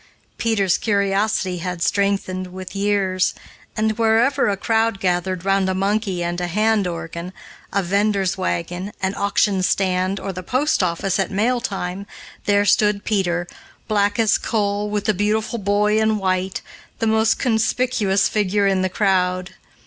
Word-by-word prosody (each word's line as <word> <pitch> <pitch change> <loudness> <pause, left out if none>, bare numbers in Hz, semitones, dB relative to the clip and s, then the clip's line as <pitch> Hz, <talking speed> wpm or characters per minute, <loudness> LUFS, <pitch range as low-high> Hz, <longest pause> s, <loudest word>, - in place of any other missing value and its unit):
Peter's 200 -5 +1
curiosity 200 -2 0
had 175 -1 -3
strengthened 195 -2 0
with 185 +1 -8
years, 195 -2 +1 0.4
and, 220 +1 0
wherever 225 +3 +3
a 200 - -1
crowd 225 0 +1
gathered 180 0 -1
round 195 -1 +2
a 190 - -1
monkey 195 -2 0
and 175 +1 -2
hand 205 +3 +1
organ, 170 +1 -6 0.4
a 200 0 0
vender's 200 0 +1
wagon, 180 +1 -3
an 190 0 -1
auction 200 -1 +1
stand, 185 +1 0
or 195 - -5
the 185 - -6
post 255 - +1
office 180 +2 0
at 195 - 0
mail 235 +5 +1
time, 195 -2 -4 0.4
there 205 0 +3
stood 210 0 +3
Peter, 175 -5 0 0.4
black 205 -1 +1
as 220 -3 +3
coal, 205 -1 -1
with 210 -1 -2
"the 215 - +3
beautiful 215 +4 -1
boy 210 +2 +2
in 220 0 +2
white," 185 -1 -1 0.3
the 225 - -1
most 220 0 +2
conspicuous 220 -4 +1
figure 205 -1 +1
in 195 -1 +2
the 185 - 0
crowd. 185 -2 0
200 Hz, 150 wpm, -21 LUFS, 185-215 Hz, 0.4 s, wherever